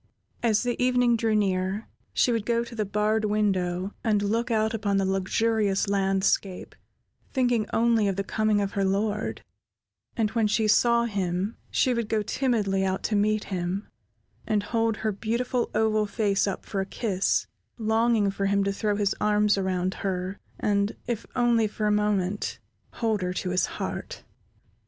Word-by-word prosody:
As 220 Hz, -2 st, +2 dB
the 245 Hz, 0 st, -1 dB
evening 250 Hz, -1 st, +3 dB
drew 225 Hz, -1 st, +1 dB
near, 195 Hz, 0 st, 0 dB, 0.2 s
she 245 Hz, -, +2 dB
would 230 Hz, -3 st, 0 dB
go 235 Hz, +1 st, +1 dB
to 235 Hz, -, -10 dB
the 215 Hz, -2 st, -1 dB
barred 210 Hz, +2 st, +1 dB
window 195 Hz, -3 st, 0 dB
and 210 Hz, -3 st, +2 dB
look 230 Hz, +4 st, 0 dB
out 220 Hz, 0 st, +1 dB
upon 205 Hz, -3 st, 0 dB
the 195 Hz, -, +2 dB
luxurious 200 Hz, +2 st, +1 dB
landscape, 195 Hz, -1 st, 0 dB, 0.6 s
thinking 245 Hz, -5 st, +1 dB
only 225 Hz, -2 st, +3 dB
of 195 Hz, -, 0 dB
the 195 Hz, -, -1 dB
coming 215 Hz, +1 st, +1 dB
of 200 Hz, -1 st, -1 dB
her 200 Hz, -, -1 dB
lord; 205 Hz, +2 st, -1 dB, 0.7 s
and 220 Hz, -2 st, +1 dB
when 225 Hz, -3 st, +2 dB
she 215 Hz, +1 st, +1 dB
saw 235 Hz, +2 st, +4 dB
him, 195 Hz, -1 st, -2 dB
she 255 Hz, -, +2 dB
would 235 Hz, -2 st, -2 dB
go 215 Hz, -1 st, +1 dB
timidly 210 Hz, -5 st, 0 dB
out 190 Hz, 0 st, -1 dB
to 215 Hz, -, 0 dB
meet 215 Hz, +1 st, +2 dB
him, 180 Hz, +3 st, -2 dB, 0.6 s
and 210 Hz, -2 st, +1 dB
hold 225 Hz, 0 st, 0 dB
her 220 Hz, -, -1 dB
beautiful 235 Hz, +4 st, -1 dB
oval 215 Hz, -1 st, +2 dB
face 200 Hz, -1 st, +1 dB
up 195 Hz, -, -4 dB
for 200 Hz, -3 st, -2 dB
a -, -, -2 dB
kiss, 195 Hz, -3 st, 0 dB, 0.3 s
longing 220 Hz, -2 st, +2 dB
for 195 Hz, 0 st, -1 dB
him 200 Hz, 0 st, +2 dB
to 200 Hz, 0 st, 0 dB
throw 210 Hz, +1 st, 0 dB
his 200 Hz, -1 st, +1 dB
arms 210 Hz, 0 st, +3 dB
around 185 Hz, -1 st, -1 dB
her, 190 Hz, 0 st, -3 dB, 0.2 s
and, 200 Hz, 0 st, +1 dB
if 230 Hz, -2 st, -3 dB
only 235 Hz, -3 st, +3 dB
for 210 Hz, +1 st, -4 dB
a 210 Hz, -, +3 dB
moment, 205 Hz, -2 st, 0 dB, 0.4 s
hold 220 Hz, -4 st, 0 dB
her 180 Hz, 0 st, -1 dB
to 180 Hz, 0 st, -3 dB
his 185 Hz, 0 st, +1 dB
heart. -, -, -5 dB
210 Hz, 170 wpm, -26 LUFS, 195-225 Hz, 0.7 s, saw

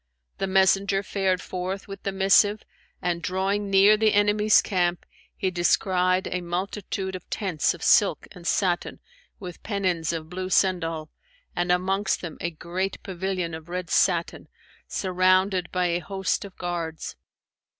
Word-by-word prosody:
The 195 Hz, -, -1 dB
messenger 195 Hz, +1 st, +3 dB
fared 190 Hz, -2 st, 0 dB
forth 185 Hz, +1 st, -4 dB
with 195 Hz, 0 st, -8 dB
the 195 Hz, -, -2 dB
missive 195 Hz, +2 st, +3 dB, 0.4 s
and, 175 Hz, -1 st, -1 dB
drawing 195 Hz, +4 st, -1 dB
near 195 Hz, +2 st, +6 dB
the 215 Hz, -1 st, +3 dB
enemy's 210 Hz, +1 st, +4 dB
camp, 175 Hz, -3 st, 0 dB, 0.3 s
he 190 Hz, -3 st, -1 dB
descried 185 Hz, +1 st, +2 dB
a 180 Hz, -, -2 dB
multitude 190 Hz, +2 st, -4 dB
of 185 Hz, -, -10 dB
tents 180 Hz, -7 st, 0 dB
of 170 Hz, -, -11 dB
silk 205 Hz, -3 st, +4 dB
and 175 Hz, -3 st, -9 dB
satin, 180 Hz, -3 st, 0 dB, 0.4 s
with 180 Hz, -4 st, -9 dB
pennons 185 Hz, -6 st, -1 dB
of 160 Hz, -2 st, -5 dB
blue 185 Hz, +2 st, -5 dB
sendal, 165 Hz, -5 st, +1 dB, 0.5 s
and 175 Hz, 0 st, 0 dB
amongst 190 Hz, +3 st, +1 dB
them 170 Hz, -3 st, -7 dB
a 170 Hz, -, -1 dB
great 175 Hz, +4 st, -4 dB
pavilion 185 Hz, -2 st, -3 dB
of 160 Hz, +1 st, -8 dB
red 180 Hz, -1 st, -4 dB
satin, 170 Hz, -3 st, +1 dB, 0.4 s
surrounded 185 Hz, 0 st, +1 dB
by 180 Hz, -1 st, 0 dB
a 175 Hz, 0 st, +1 dB
host 190 Hz, +3 st, -2 dB
of 195 Hz, -, -12 dB
guards. 170 Hz, -3 st, -4 dB
185 Hz, 145 wpm, -25 LUFS, 175-195 Hz, 0.5 s, near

